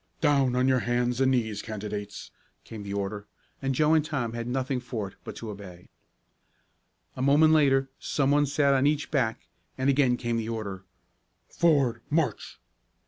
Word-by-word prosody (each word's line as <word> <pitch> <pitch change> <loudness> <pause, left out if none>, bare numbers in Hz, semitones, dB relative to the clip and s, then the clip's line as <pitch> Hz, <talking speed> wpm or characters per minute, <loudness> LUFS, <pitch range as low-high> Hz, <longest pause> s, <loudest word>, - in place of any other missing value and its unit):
"Down 140 -5 +2
on 125 +1 +2
your 130 -1 +3
hands 120 +1 0
and 130 - +4
knees, 110 -5 0
candidates," 105 -1 -6 0.3
came 110 -2 -9
the 100 -1 -7
order, 100 +1 -4 0.3
and 135 -1 -1
Joe 155 +3 +3
and 160 -1 +4
Tom 135 -7 -3
had 115 0 -4
nothing 130 +1 -1
for 115 -5 -5
it - - -20
but - - -8
to 110 -2 -6
obey. 95 -4 -11 1.3
A - - -5
moment 150 +4 +5
later 135 -3 +3
some 140 -1 0
one 145 0 +3
sat 140 0 +2
on 135 +1 +3
each 150 0 -1
back 125 -7 0 0.4
and 130 +1 +2
again 130 -3 +2
came 120 -1 -2
the 115 0 -3
order: 100 -5 -5 0.6
"Forward 140 -9 +2
march!" 150 -8 -1
125 Hz, 170 wpm, -27 LUFS, 110-140 Hz, 1.3 s, moment